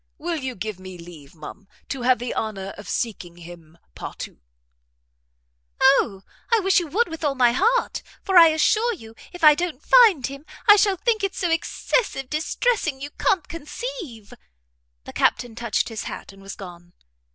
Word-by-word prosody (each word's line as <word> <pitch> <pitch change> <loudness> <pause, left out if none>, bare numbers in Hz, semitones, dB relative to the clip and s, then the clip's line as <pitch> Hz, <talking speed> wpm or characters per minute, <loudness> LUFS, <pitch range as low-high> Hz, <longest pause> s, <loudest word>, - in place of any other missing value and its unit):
Will 340 +1 -3
you 260 -4 -5
give 205 0 -5
me 185 -1 -10
leave, 170 -4 -13
ma'am, 195 +5 -11 0.2
to 270 - -4
have 250 +1 +3
the 245 +1 -4
honour 195 -3 -4
of 205 - -11
seeking 185 -7 -4
him 170 -1 -13 0.2
partout?" - - -8 1.4
"O, 235 -7 +3 0.3
I 460 - +5
wish 385 0 +3
you 345 - -4
would 435 +10 +1
with 325 -1 -8
all 285 -2 0
my 245 -2 +4
heart; 460 - +1 0.2
for 385 - -1
I 335 -2 +10
assure 425 +9 +2
you 225 - -13 0.2
if 355 -2 -11
I 305 -1 +9
don't 320 -3 -4
find 430 - +6
him, 275 +1 -7 0.2
I 415 - +10
shall 400 -2 +2
think 440 +1 0
it 390 -1 -1
so 350 -3 -1
excessive 330 - -1
distressing 315 - 0
you 285 +2 -7
can't 365 +1 0
conceive." 330 - -7 0.7
The - - -10
Captain 245 -2 +1
touched 235 -1 -1
his 225 -2 -6
hat, - - -8
and 195 - -16
was 195 0 -8
gone. 175 -2 -12
275 Hz, 175 wpm, -23 LUFS, -, 1.4 s, I